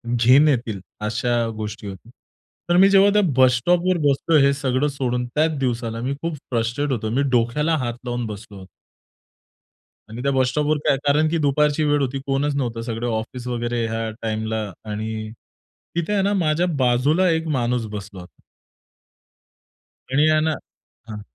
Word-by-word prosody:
घिन 130 +6 +5
येतील 120 -8 0 0.3
अशा 120 +3 0 0.3
गोष्टी 105 0 -6
होती. 100 +4 -10 0.6
तर 175 - +4
मी 195 +1 +7
जेव्हा 200 0 +6
त्या 210 - +4 0.2
बस 130 -1 +5
स्टॉपवर 175 +7 +2
बसलोय 145 +2 +3
हे 140 - +3
सगळं 135 +1 0
सोडून 125 -3 -2
त्याच 155 +4 0
दिवसाला 115 -3 -2
मी 130 +3 -2
खूप 165 -1 -3 0.2
फ्रस्ट्रेट 120 +5 -1
होतो. 110 -4 -2
मी 130 +5 0
डोक्याला 125 +7 +1
हात 120 -3 -2
लावून 120 0 -3
बसलो 105 -1 -8
होतो. 95 - -12 1.4
आणि 115 +3 -7
त्या 140 - +1
बस 130 -2 +2
स्टॉपवर 150 +3 0
काय 135 - +4
कारण 150 +2 +3
की 165 - 0
दुपारची 150 +2 +2
वेळ 145 -1 +2
होती, 135 0 -2
कोणच 140 +1 0
नव्हतं. 120 -4 -2
सगळं 115 0 -4
ऑफिस 115 +3 -4
वगैरे 120 -1 -2
ह्या 110 0 -3
टाइमला 110 0 -2 0.3
आणि 110 +1 -4 0.7
तिथे 170 +4 -1
आहे 200 - +2
ना 200 +1 +1
माझ्या 170 -2 +1 0.2
बाजूला 145 +9 +3
एक 160 0 0
माणूस 120 -1 0
बसला 100 -2 -7
होता. 90 - -17 1.7
आणि 145 +3 +3
यांना 155 0 +2 0.6
हं. 105 -1 -7
130 Hz, 160 wpm, -22 LUFS, 115-150 Hz, 1.7 s, मी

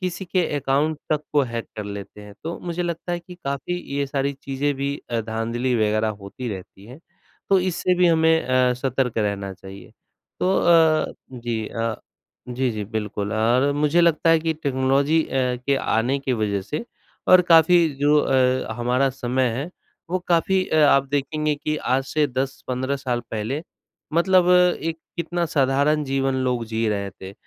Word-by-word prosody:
किसी 185 0 -3
के 180 -1 0
अकाउंट 145 +3 0
तक 150 -1 +1
को 145 -1 +4
हैक 115 -1 -4
कर 105 - -4
लेते 100 0 -8
हैं, 105 0 -12
तो 165 +2 -5
मुझे 175 0 -3
लगता 170 +1 -4
है 175 - -2
कि 180 +1 -12
काफ़ी 140 +5 -3 0.2
ये 140 - 0
सारी 140 0 -1
चीजें 140 +1 -2
भी 140 +1 -2
अ, 115 -1 0
धाँधली 115 +3 -2
वगैरह 110 0 +1
होती 120 +5 -6
रहती 95 0 -8
हैं, 125 +5 -12 0.5
तो 195 - +6
इससे 180 0 0
भी 180 - +5
हमें 160 -1 +4
अ, 130 0 +3
सतर्क 125 -2 -1
रहना 100 -2 -2
चाहिए। 95 +1 -12 0.5
तो 190 +1 +2
अ, 160 -2 +4 0.2
जी 115 -3 -3
अ, 115 -1 -2 0.5
जी, 125 0 -1
जी, 105 -1 -4
बिल्कुल। 105 -1 -4
और 120 +6 +2
मुझे 150 +3 +2
लगता 165 -1 +3
है 165 - +5
कि 160 0 0
टेक्नोलॉजी 140 +3 +2
अ, - - -14
के 125 +1 0
आने 130 +2 0
की 135 -1 -2
वजह 105 -4 0
से 150 - -5 0.4
और 185 - +8
काफ़ी 165 +1 +6
जो 145 +1 +4
अ, 130 -4 +1
हमारा 125 +3 +1
समय 130 0 0
है 155 +6 -4 0.4
वो 185 - +1
काफ़ी 185 +2 +2
अ, - - 0
आप 140 -1 +4
देखेंगे 150 +2 -1
कि 155 +1 -3
आज 135 -2 0
से 150 +2 +1
10-15 130 0 -3
साल 125 -3 -2
पहले 115 +8 -3 0.5
मतलब 180 +1 +4
एक 180 -2 +3 0.2
कितना 170 +1 -1
साधारण 140 +2 +2
जीवन 135 -1 0
लोग 125 -2 0
जी 115 0 0
रहे 100 -2 -2
थे, 95 +1 -11
135 Hz, 175 wpm, -23 LUFS, 120-160 Hz, 0.5 s, और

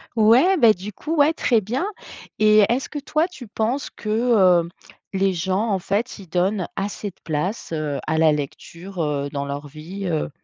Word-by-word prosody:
Ouais, 240 - +5
beh, 230 -6 +6
du 200 +2 -8
coup 315 +9 -4
ouais, 295 +3 +5
très 235 -7 +2
bien 240 - -2 0.5
et 215 0 +6
est-ce 255 +3 0
que, 295 - -5
toi, 310 +4 0
tu 255 - -11
penses 230 +6 -1
que, 215 -5 +3
heu, 170 - -8 0.4
les 195 0 +1
gens 190 +6 -1
en 195 - +2
fait, 205 +5 -2
ils 185 -4 -12
donnent 185 +2 0
assez 200 +1 -3
de 175 - -18
place, 165 +4 -3
heu, 150 -3 -2
à 160 - 0
la 160 -1 +5
lecture, 165 +5 -5
heu, 145 -1 -1
dans 140 0 -2
leur 140 +1 -5
vie, 165 +7 -8
heu? 160 -3 -1
195 Hz, 190 wpm, -22 LUFS, 165-230 Hz, 0.5 s, beh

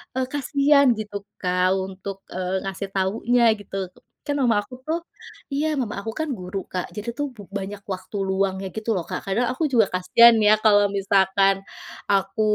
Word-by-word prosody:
eee, 260 -1 0
kasihan 280 0 +3
gitu 205 -2 -5 0.2
Kak 180 0 +1
untuk, 190 +1 -6 0.2
eee, 185 +1 -1
ngasih 195 0 -5
tahunya 225 +6 +1 0.2
gitu. 195 -1 -7 0.5
Kan 290 - 0
mama 235 -6 +2
aku 250 - -11
tuh 325 +2 -1 0.5
iya 295 +3 0
mama 230 -5 -2
aku 225 - -4
kan 315 -1 -1
guru 180 +1 -6
Kak, 180 -1 -2
jadi 215 +2 -5
tuh 290 0 -1
b - - -26 0.2
banyak 200 +1 -7
waktu 185 +3 -9
luangnya 190 0 0
gitu 220 +1 -4
loh 180 - 0
Kak. - - -3
Kadang 225 +6 +1
aku 260 +6 -3
juga 225 -5 +5
kasihan 230 +6 +6
ya 215 - +7
kalau 205 -1 +5
misalkan 195 0 +3 0.6
aku 195 +1 +1
200 Hz, 170 wpm, -23 LUFS, 190-240 Hz, 0.6 s, ya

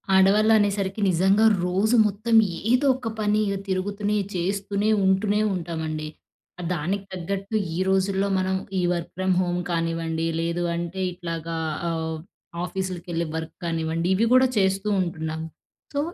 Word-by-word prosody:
ఆడవాళ్ళు 205 +3 +5
అనేసరికి 200 0 0
నిజంగా 195 +5 +4 0.2
రోజు 200 +6 +2
మొత్తం 215 +3 -1 0.4
ఏదో 255 +3 +3
ఒక 255 -3 -6
పని 210 0 +2 0.3
తిరుగుతూనే, 205 +2 -1 0.2
చేస్తూనే, 200 +3 -1 0.2
ఉంటూనే 200 +2 +2
ఉంటామండి. 160 -3 -4 0.7
దానికి 185 +5 -2
తగ్గట్టు 195 +4 -4 0.2
ఈ - - -3
రోజుల్లో 190 +1 +1
మనం, 190 0 0 0.2
ఈ - - +1
వర్క్ 170 -2 -4
ఫ్రమ్ 185 0 +1
హోమ్ 175 -1 -1
కానివ్వండి 165 -1 -1
లేదు 170 +1 -1
అంటే 170 +2 -4
ఇట్లాగా 165 -2 -5 0.3
ఆహ్, 160 -1 -2 0.5
ఆఫీస్‌లకి 185 -1 -4
వెళ్ళి 170 0 -1
వర్క్ 160 0 -5
కానివ్వండి 165 0 -1
ఇవి 220 +5 +2
కూడా 255 0 +6
చేస్తూ 195 +1 +1
ఉంటున్నాం. 160 -2 -3 0.5
సో, 285 - 0
185 Hz, 130 wpm, -24 LUFS, 170-200 Hz, 0.7 s, కూడా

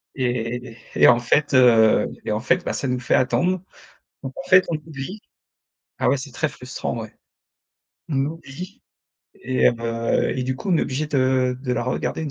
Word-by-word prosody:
Et 120 -2 -3 0.2
et - - +6
en 120 0 +6
fait, 140 +4 +1
heu, 115 -4 +5 0.2
et - - -2
en 105 - 0
fait 175 +8 +1
bah, - - -1
ça 135 - -3
nous 125 0 -1
fait 120 - +1
attendre. 140 +9 +1 0.6
Donc 135 -1 -5
en 180 - -8
fait 185 0 +7
on 160 - 0
oublie. 155 +6 -8 0.8
Ah - - +2
ouais 140 - +2
c'est 135 0 -8
très 155 +4 -1
frustrant, 125 -2 -5
ouais. 110 - -9 1.0
On 140 -4 -1
oublie 165 +4 -8 0.5
et 130 0 +2
heu, 115 -1 0
et 130 - -1
du 130 0 -1
coup 195 - -4
on 170 - +4
est - - +2
obligé 145 +4 -2
de 130 -2 +1
de 125 -2 -2
la 120 - -1
regarder 130 +5 -2
une 150 - -4
130 Hz, 190 wpm, -22 LUFS, 120-150 Hz, 1.0 s, fait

